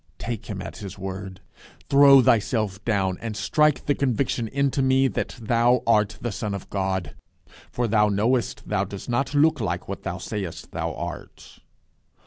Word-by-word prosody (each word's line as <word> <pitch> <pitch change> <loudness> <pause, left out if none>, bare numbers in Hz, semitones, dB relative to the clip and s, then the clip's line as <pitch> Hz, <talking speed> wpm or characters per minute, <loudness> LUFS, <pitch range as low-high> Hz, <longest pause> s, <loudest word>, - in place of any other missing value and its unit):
Take 115 -3 -5
him 100 -2 -5
at - - -8
his 100 -3 -8
word. 95 0 -7 0.5
Throw 140 -1 +7
thyself 110 -3 +1
down, 95 -5 0
and 110 -2 -5
strike 150 +7 +2
the 145 - +2
conviction 125 -3 -1
into 140 +2 0
me 130 0 +3
that 130 - -4
thou 120 +2 +2
art 105 -3 +2
the 120 - -3
Son 105 -1 -3
of 100 - -9
God. 95 -6 -2 0.6
For 120 -1 -1
thou 105 -1 +3
knowest 115 +5 0
thou 105 -2 0
dost 100 +2 -8
not 135 +4 -1
look 155 -1 +3
like 90 -4 -3
what 100 - -5
thou 90 -2 -4
sayest 95 -4 -6
thou - - -3
art." - - -8
110 Hz, 165 wpm, -24 LUFS, 100-130 Hz, 0.6 s, Throw